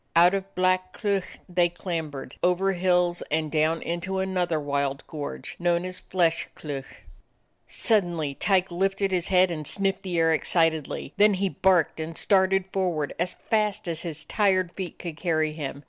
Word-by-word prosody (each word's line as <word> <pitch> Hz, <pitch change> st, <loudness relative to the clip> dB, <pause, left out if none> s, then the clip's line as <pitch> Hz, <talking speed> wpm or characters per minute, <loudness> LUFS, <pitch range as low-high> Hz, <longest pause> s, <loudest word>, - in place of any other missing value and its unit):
Out 175 Hz, +2 st, +6 dB
of 195 Hz, 0 st, -3 dB
Black 185 Hz, 0 st, +1 dB
Cleuch 200 Hz, -3 st, -2 dB
they 175 Hz, -1 st, +2 dB
clambered, 165 Hz, -6 st, -5 dB
over 180 Hz, +2 st, +2 dB
hills, 180 Hz, -1 st, +1 dB
and 155 Hz, 0 st, -1 dB
down 160 Hz, +1 st, +1 dB
into 175 Hz, +3 st, -3 dB
another 180 Hz, -4 st, 0 dB
wild 140 Hz, -1 st, -2 dB
gorge 150 Hz, -2 st, -6 dB
known 175 Hz, 0 st, +1 dB
as 185 Hz, 0 st, -5 dB
Flesh 170 Hz, -3 st, 0 dB
Cleuch. 140 Hz, -3 st, -7 dB, 0.6 s
Suddenly 175 Hz, -, +1 dB
Tyke 185 Hz, +4 st, +1 dB
lifted 195 Hz, +2 st, 0 dB
his 180 Hz, -2 st, 0 dB
head 185 Hz, -1 st, +4 dB
and 155 Hz, -3 st, -4 dB
sniffed 195 Hz, -1 st, 0 dB
the 185 Hz, -3 st, -3 dB
air 165 Hz, 0 st, +4 dB
excitedly; 160 Hz, -3 st, 0 dB
then 210 Hz, -1 st, +5 dB
he 195 Hz, +1 st, 0 dB
barked 180 Hz, -5 st, +2 dB
and 160 Hz, +1 st, -5 dB
started 195 Hz, -1 st, +3 dB
forward 175 Hz, -6 st, -1 dB
as 175 Hz, +1 st, -1 dB, 0.2 s
fast 210 Hz, -2 st, +1 dB
as 165 Hz, -1 st, -2 dB
his 160 Hz, -3 st, -4 dB
tired 185 Hz, -1 st, +1 dB
feet 180 Hz, -3 st, -6 dB
could 165 Hz, -4 st, -7 dB
carry 160 Hz, -3 st, 0 dB
him. 140 Hz, -3 st, -5 dB
175 Hz, 160 wpm, -26 LUFS, 160-190 Hz, 0.6 s, Out